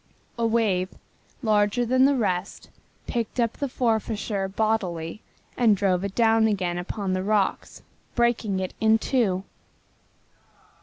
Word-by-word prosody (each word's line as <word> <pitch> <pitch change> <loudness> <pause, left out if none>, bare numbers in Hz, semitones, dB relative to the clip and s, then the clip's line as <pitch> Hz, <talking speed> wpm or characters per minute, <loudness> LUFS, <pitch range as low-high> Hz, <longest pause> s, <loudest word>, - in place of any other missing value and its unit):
A 230 - +2
wave, 205 -5 +1 0.5
larger 215 +2 +2
than 255 +2 +4
the 280 0 +4
rest, 190 -5 -2 0.4
picked 235 +1 -3
up 235 -1 +1
the 280 - -3
Forfarshire 220 -4 -1
bodily 190 -4 -2 0.3
and 225 -4 +4
drove 185 -2 +1
it 200 -1 -4
down 225 -1 +4
again 180 -4 -1
upon 190 +1 -3
the 185 - 0
rocks, 205 0 -1 0.3
breaking 235 -5 +1
it 185 -1 -4
in 220 0 +5
two. 215 -6 0
215 Hz, 125 wpm, -25 LUFS, 190-230 Hz, 0.5 s, in